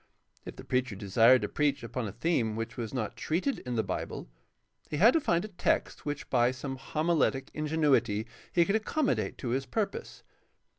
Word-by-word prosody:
If - - -7
the - - -10
preacher 125 -4 -1
desired 110 +5 +4
to - - 0
preach 140 -1 0
upon 115 0 -3
a - - -5
theme 115 - 0
which 115 0 -4
was 115 -3 -4
not 120 -6 -3
treated 185 - -1
in 125 -1 -4
the 110 - +1
Bible - - -4 0.6
he 150 - -2
had 225 +10 +7
to 325 - +3
find 175 -5 +1
a 205 -4 -12
text - - 0
which 145 +2 -3
by 120 -1 +4
some 135 +1 -5
homiletic 150 -1 0
ingenuity 150 -9 +1 0.3
he 170 -1 +4
could 200 - +1
accommodate 265 +7 0
to 125 - -4
his 130 +2 -1
purpose. 220 - -3
135 Hz, 185 wpm, -30 LUFS, 120-170 Hz, 0.6 s, had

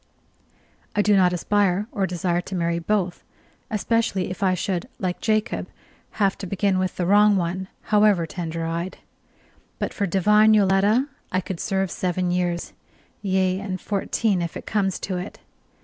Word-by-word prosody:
I 205 - +3
do 205 0 +4
not 185 -2 +4
aspire 200 +2 +1
or 200 -5 0
desire 175 0 -1
to 190 - -6
marry 170 -1 0
both, 185 0 -1 0.5
especially 215 -4 0
if 185 - -7
I 185 -2 +3
should, 180 -1 -2
like 180 -2 -3
Jacob, 215 0 0 0.5
have 200 -3 +1
to 195 - -5
begin 195 0 +1
with 185 0 -1
the 180 - -1
wrong 205 +2 +5
one, 185 +1 -2 0.3
however 205 -5 +5
tender 165 -1 -4
eyed: 170 +3 -3 0.8
but - - -3
for 200 - -1
divine 210 +4 +5
Yoletta 205 +6 +3 0.2
I 185 - +1
could 185 -1 -5
serve 195 -2 -1
seven 180 0 -1
years; 175 -1 -1 0.5
yea, 190 -1 +1
and 190 -2 -4
fourteen, 200 0 0
if 170 -1 -4
it - - -9
comes 195 -3 0
to 185 -2 -2
it. 180 +3 -6
190 Hz, 160 wpm, -23 LUFS, 180-205 Hz, 0.8 s, wrong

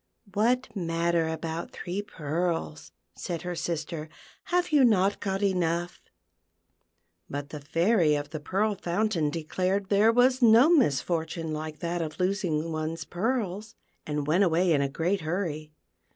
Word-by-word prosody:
" - - -51
What 230 +2 +1
matter 170 -2 0
about 160 +1 -4
three 180 +3 -4
pearls," 165 - -3 0.2
said 170 -3 -5
her 180 0 -3
sister; 165 -2 -4 0.2
" - - -21
have 355 -1 0
you 290 -3 +5
not 205 -4 +3
got 195 0 -2
enough 175 -3 0 0.6
.''" 85 +1 -48
But 145 +1 -5
the 150 - -7
Fairy 165 +2 +2
of 145 0 -4
the 155 - -4
Pearl 200 +8 0
Fountain 185 -3 0
declared 185 +5 -2
there 210 +3 +5
was 250 +2 +3
no 235 +5 +7
misfortune 165 - +1
like 155 0 -6
that 170 0 -2
of 155 +1 -5
losing 180 -4 0
one's 160 +1 -3
pearls, 210 0 -2 0.3
and 150 -1 -3
went 170 +7 +3
away 175 -1 +3
in 145 - +2
a 140 - 0
great 175 +7 -1
hurry. 155 -2 -3
170 Hz, 150 wpm, -27 LUFS, 155-200 Hz, 0.6 s, no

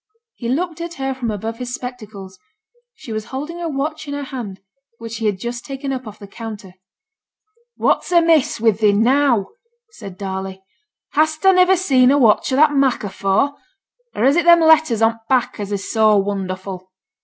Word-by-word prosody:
He 235 - -6
looked 330 +4 -2
at 340 0 -6
her 270 0 -3
from 255 -3 -4
above 220 +2 -5
his 250 0 -4
spectacles; 210 -7 -9 0.6
she 225 - -9
was 215 0 -4
holding 300 +6 -6
a 335 - -2
watch 305 +2 -4
in 285 - -4
her 285 - -4
hand 235 -8 -7 0.4
which 230 -1 -9
she 230 -1 -2
had 205 -2 0
just 240 +4 -5
taken 275 0 -5
up 255 -3 -6
off 210 - -10
the 200 - -11
counter. 205 -2 -9 1.0
'What's - - 0
amiss 330 -7 +3
wi' 225 0 +4
thee 210 0 +2
now?' 240 0 +2 0.4
said 200 - -11
Darley. 190 -1 -6 0.5
'Hast 310 +2 +1
ta 385 - +7
niver 365 0 +5
seen 260 -8 +3
a 280 - +4
watch 230 -1 +3
o' - - +1
that 295 +1 +4
mak' 275 -4 +1
afore? 195 +7 0 0.6
or 215 - -1
is 275 +3 +4
it 345 -1 +1
them 340 0 +7
letters 315 -8 +4
on 225 - +5
t' 225 - -20
back, 255 -3 +1
as 205 -1 -5
is 200 -1 -4
so 215 -2 +4
wonderful?' 190 -1 -4
245 Hz, 190 wpm, -19 LUFS, 205-285 Hz, 1.0 s, ta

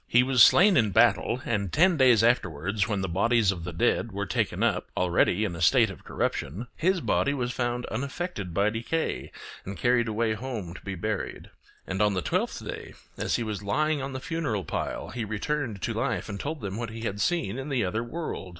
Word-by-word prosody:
He 125 +1 +5
was 130 -2 +3
slain 190 - +7
in 110 -4 +3
battle, 120 +5 +3
and 100 -5 -1
ten 180 +3 +4
days 125 -6 +5
afterwards, 95 -4 +1
when 105 -3 -1
the 95 - -1
bodies 105 +4 +2
of 90 -4 -6
the 90 - -4
dead 115 +5 +1
were 100 +1 -3
taken 95 - -1
up - - 0
already 90 +3 +2
in 90 -5 -3
a 85 - -7
state 110 +4 +4
of 95 - -12
corruption, 80 - -3
his 185 +2 +1
body 140 -1 +1
was 125 -2 -2
found 120 0 -2
unaffected 135 - -4
by 100 +5 +2
decay, 115 +9 -2 0.3
and 100 +1 -7
carried 120 -1 +2
away 110 0 0
home 110 -6 -5
to - - -11
be 95 -1 -5
buried. 105 +3 -4 0.3
And 95 +2 -2
on 105 -2 +3
the 90 - -1
twelfth - - -1
day, - - -7 0.2
as - - -1
he 120 - -1
was 105 -2 -4
lying 150 +8 0
on 135 0 -5
the 130 - -4
funeral 145 - -2
pile, - - -4
he 120 - -3
returned 110 - -3
to - - -1
life - - -2
and 100 - -5
told 150 +5 -4
them 100 -1 -4
what 115 -1 -4
he 115 0 -8
had 100 -3 -3
seen 135 - 0
in 135 +2 -5
the 130 -7 +1
other 110 +5 -1
world. 120 - -5
115 Hz, 215 wpm, -27 LUFS, 100-130 Hz, 0.3 s, slain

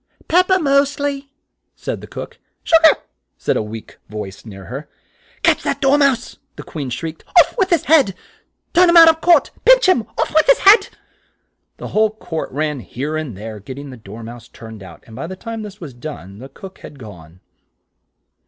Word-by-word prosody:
"Pep 360 +3 +3
per, 375 - +3
most 280 -3 +1
ly," 280 -1 -3 0.5
said - - -5
the - - -11
cook. - - -9 0.3
"Sug 330 0 +5
ar," 320 - +6 0.4
said - - -1
a - - 0
weak 110 +1 -9
voice 105 0 -8
near 95 -2 -11
her. 140 +4 -8 0.5
"Catch - - +3
that - - -2
Dor 275 -1 +3
mouse," 275 -5 +1 0.2
the - - -9
Queen 145 -5 -6
shrieked 160 +5 -6
out. - - -28
"Off - - -17
with 380 -1 +2
his 340 -5 +2
head! 280 - +3 0.6
Turn 355 0 +5
him 340 - +5
out 330 -1 +10
of 320 0 +1
court! 340 -3 +4
Pinch - - +5
him! 240 - +2
Off 315 - -1
with 315 +7 +3
his - - +6
head!" 410 +4 +6 0.9
The - - -8
whole 215 0 +2
court 190 -7 -6
ran 150 0 -2
here 140 +6 -5
and 150 -10 -5
there, 110 +1 -8
get 130 +7 -9
ting 140 0 -9
the - - -9
Dor 110 0 -11
mouse 120 +1 -10
turned 110 -2 -12
out, 95 -3 -13
and 110 - -14
by 135 +7 -6
the 190 - -7
time 225 +3 -7
this 210 -1 -10
was 150 -7 -9
done, 120 - -9
the 135 +3 -10
cook 190 +3 -12
had 145 - -12
gone. 90 - -13
160 Hz, 205 wpm, -18 LUFS, -, 0.9 s, out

